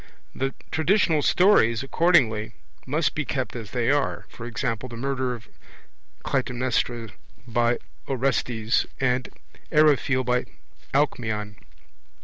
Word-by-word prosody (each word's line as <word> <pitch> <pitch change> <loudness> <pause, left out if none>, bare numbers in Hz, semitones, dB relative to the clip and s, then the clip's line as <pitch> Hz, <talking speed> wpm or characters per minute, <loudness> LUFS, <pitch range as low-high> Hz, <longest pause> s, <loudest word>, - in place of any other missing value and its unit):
The 135 0 -2 0.2
traditional 160 0 +3
stories, 135 - +4
accordingly, 125 -9 +2 0.3
must 150 +1 +1
be 150 - -1
kept 130 -2 -3
as 115 -4 -6
they 120 0 +1
are, 145 -1 0 0.2
e.g. 120 -1 -3 0.2
the 120 - -8
murder 130 0 -1
of 115 -2 -13 0.8
Clytaemnestra 120 -2 -1 0.4
by 120 0 +2 0.3
Orestes 125 -4 0
and 125 -1 +1
of - - -19 0.4
Eriphyle 145 -4 +4
by 125 0 +1 0.5
Alcmeon. 110 -7 0
125 Hz, 110 wpm, -25 LUFS, 115-140 Hz, 0.8 s, stories